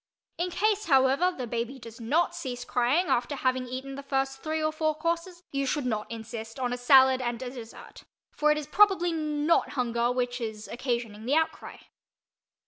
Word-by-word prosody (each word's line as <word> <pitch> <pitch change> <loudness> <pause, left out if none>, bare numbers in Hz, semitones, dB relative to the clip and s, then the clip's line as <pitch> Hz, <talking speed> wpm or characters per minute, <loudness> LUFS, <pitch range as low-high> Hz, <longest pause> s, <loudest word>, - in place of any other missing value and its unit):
In 355 +1 0
case, 420 +4 +1
however, 275 +5 +4
the 260 -8 -5
baby 235 +3 -3
does 230 -1 -11
not 300 +10 +1
cease 245 -5 -5
crying 250 +11 +2
after 245 -1 0
having 255 -1 0
eaten 260 +2 -6
the 280 - -6
first 270 -1 -2
three 315 0 -2
or 310 0 +1
four 310 0 0
courses, 335 +2 -3
you 275 -1 -1
should 290 0 -1
not 215 -4 -2
insist 225 +1 -7
on 250 -1 -1
a - - -2
salad 260 0 +6
and 240 -2 -2
a 250 - -5
dessert, 235 -3 -11 0.3
for 300 0 +2 0.2
probably 385 -4 +4
it - - -3
is - - -2
not 300 +1 +1
hunger 240 -2 0
which 245 0 -2
is 220 -1 -5
occasioning 235 -4 -3
the 280 - +3
outcry. 320 0 -1
265 Hz, 185 wpm, -28 LUFS, 240-310 Hz, 0.3 s, salad